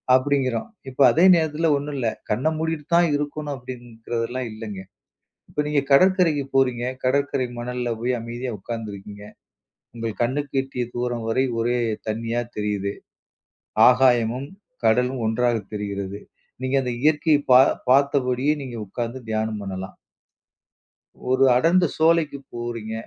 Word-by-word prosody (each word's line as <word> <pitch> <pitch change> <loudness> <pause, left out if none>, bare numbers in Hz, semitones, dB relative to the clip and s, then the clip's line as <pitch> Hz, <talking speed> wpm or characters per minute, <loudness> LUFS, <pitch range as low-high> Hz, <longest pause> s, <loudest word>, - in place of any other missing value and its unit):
அப்டிங்கிறோம். 130 - 0 0.2
இப்ப 135 +2 +2
அதே 165 +8 +4
நேரத்துல 160 0 +1
ஒண்ணும் 145 +1 -5
இல்ல. 125 -3 -1 0.2
கண்ண 120 +8 0
மூடிட்டு 160 -2 -2
தான் 175 0 +5
இருக்கணும் 145 0 -3
அப்டிங்கறது 120 -2 -5
எல்லாம் 130 0 -3
இல்லங்க. 110 -3 -7 0.7
இப்ப 150 - -1
நீங்க 150 -1 +2
கடற்கரைக்கு 170 -1 +4
போறீங்க. 125 -3 +2 0.2
கடற்கரை 140 0 +1
மணல்ல 125 0 -3
போய் 125 +2 0
அமைதியா 120 +2 -5
உக்காந்துருக்கீங்க. 105 -1 -7 0.7
உங்கள் 115 -2 -4
கண்ணுக்கு 140 +3 -1
எட்டிய 130 -2 -4
தூரம் 120 -1 -2
வரை 130 +4 +2 0.2
ஒரே 120 +2 +1 0.3
தண்ணியா 115 +2 -1 0.2
தெரியுது. 100 -1 -2 0.9
ஆகாயமும் 125 0 +3 0.4
கடலும் 125 +2 +2
ஒன்றாகத் 115 -2 0
தெரிகிறது. 100 -1 -4 0.4
நீங்க 130 +1 0
அந்த 125 -1 -2
இயற்கைய 155 0 +3
பா 125 - +9 0.3
பாத்தபடியே 135 0 +3
நீங்க 125 -3 -7
உக்காந்து 120 +5 -4
தியானம் 110 -1 -1
பண்ணலாம். 95 -1 -6 1.3
ஒரு 130 +1 +3
அடர்ந்த 170 +6 +4
சோலைக்கு 160 -3 +2
போறீங்க. 120 -2 -5
125 Hz, 120 wpm, -23 LUFS, 115-140 Hz, 1.3 s, பா